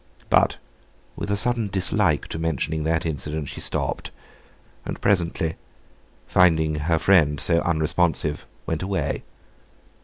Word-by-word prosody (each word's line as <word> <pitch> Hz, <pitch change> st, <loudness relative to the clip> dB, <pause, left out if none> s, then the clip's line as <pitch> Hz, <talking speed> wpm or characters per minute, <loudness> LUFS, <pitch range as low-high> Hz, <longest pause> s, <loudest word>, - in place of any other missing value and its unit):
But, -, -, +4 dB, 0.6 s
with -, -, -5 dB
a 100 Hz, -, +1 dB
sudden 115 Hz, 0 st, +1 dB
dislike 95 Hz, -2 st, +1 dB
to 80 Hz, -, -4 dB
mentioning 80 Hz, -1 st, -1 dB
that 80 Hz, +1 st, 0 dB
incident, 75 Hz, -1 st, -3 dB
she -, -, -6 dB
stopped; -, -, -1 dB, 0.7 s
and -, -, -5 dB
presently, 85 Hz, -4 st, 0 dB, 0.7 s
finding 80 Hz, -4 st, +3 dB
her 80 Hz, +2 st, 0 dB
friend 80 Hz, -5 st, +4 dB
so 85 Hz, -1 st, +3 dB
unresponsive, 80 Hz, -1 st, 0 dB, 0.2 s
went 80 Hz, -1 st, -2 dB
away. 95 Hz, 0 st, -2 dB
80 Hz, 120 wpm, -24 LUFS, 80-90 Hz, 0.7 s, But